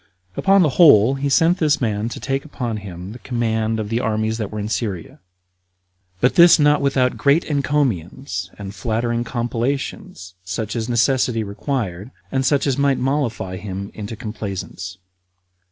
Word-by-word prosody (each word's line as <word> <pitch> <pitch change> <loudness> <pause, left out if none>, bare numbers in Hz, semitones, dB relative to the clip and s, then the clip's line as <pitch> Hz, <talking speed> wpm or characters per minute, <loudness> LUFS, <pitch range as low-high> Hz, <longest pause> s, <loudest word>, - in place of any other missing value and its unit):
Upon 195 -1 +4
the 155 - +3
whole, 130 -6 +7
he 140 +1 -2
sent 165 +6 +3
this 155 -2 +2
man 110 -2 -1
to - - -7
take 135 0 -2
upon 120 -7 -4
him 95 -2 -8
the 120 - -10
command 110 -3 -1
of 105 -1 -4
the 115 +1 0
armies 110 0 -1
that 105 -3 -3
were 105 - -6
in 105 - -3
Syria; 110 - -4 1.0
but 125 +5 +3
this 170 0 +8
not 150 -1 +4
without 135 -2 +1
great 145 +4 +3
encomiums 130 - -1
and 100 -1 -7
flattering 115 +1 -1
compellations, 120 - -3
such 100 +5 -4
as 115 0 -3
necessity 120 -1 +2
required, 100 -2 -4 0.2
and 135 0 0
such 140 +1 +2
as 140 -1 0
might 140 -2 +3
mollify 125 -9 -1
him 100 0 -6
into 105 +1 -6
complaisance. 100 -5 -6
115 Hz, 155 wpm, -20 LUFS, 105-135 Hz, 1.0 s, this